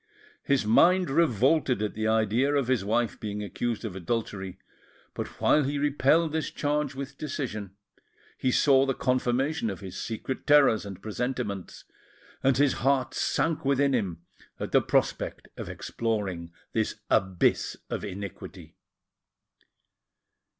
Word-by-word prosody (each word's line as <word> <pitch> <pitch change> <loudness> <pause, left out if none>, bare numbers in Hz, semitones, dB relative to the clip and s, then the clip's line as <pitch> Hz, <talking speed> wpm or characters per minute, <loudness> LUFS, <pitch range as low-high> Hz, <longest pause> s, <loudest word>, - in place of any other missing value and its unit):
His 140 -6 +1
mind 175 - +4
revolted 135 -2 +3
at 105 - -2
the 110 0 -2
idea 110 +6 +2
of 135 -3 +1
his 125 -7 +2
wife 115 +2 0
being 105 -1 -4
accused 115 +2 -3
of 100 -5 -5
adultery; 95 -1 -3 0.6
but - - -4
while 150 - +4
he 140 +2 -1
repelled 145 +3 +2
this 160 0 -1
charge 145 -1 -1
with 140 +1 -7
decision, 110 -9 -4 0.6
he 130 - 0
saw 135 0 +4
the 135 - 0
confirmation 125 +1 0
of 95 - -5
his 95 -2 -8
secret 115 +3 -5
terrors 140 -8 +5
and 95 -1 -9
presentiments, 110 -3 -4 0.6
and 135 -2 +3
his 145 -1 +4
heart 135 -1 +2
sank 165 -2 0
within 140 0 +2
him 90 -9 -2 0.4
at - - -4
the - - +5
prospect - - -1
of - - -7
exploring 100 -7 -3 0.2
this 110 -1 0 0.2
abyss 95 -2 +2
of - - -3
iniquity. 100 -1 -8
125 Hz, 135 wpm, -27 LUFS, 105-140 Hz, 0.6 s, terrors